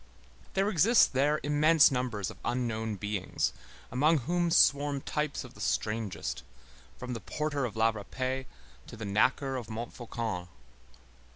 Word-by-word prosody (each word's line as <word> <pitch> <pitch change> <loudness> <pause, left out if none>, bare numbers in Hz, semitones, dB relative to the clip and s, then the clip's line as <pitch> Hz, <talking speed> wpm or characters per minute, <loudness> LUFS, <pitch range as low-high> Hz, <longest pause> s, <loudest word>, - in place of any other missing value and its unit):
There 195 +1 +2
exist 215 - +5
there 145 +3 +2
immense 150 +2 +5
numbers 125 -6 -2
of - - -15
unknown 110 -3 -1
beings, 105 -1 -2 0.4
among 150 +6 +3
whom 175 +1 +1
swarm 145 -3 +4
types 150 0 -2
of - - -12
the - - -12
strangest, 105 - -2 0.6
from 125 0 -5
the 115 - -4
porter 145 +5 -2
of 115 - -5
la 110 +1 +3
Râpée 130 +5 -4 0.4
to - - -10
the 110 - -5
knacker 130 +6 +1
of 115 - -9
Montfaucon. 115 -4 -5
125 Hz, 135 wpm, -30 LUFS, 110-145 Hz, 0.6 s, exist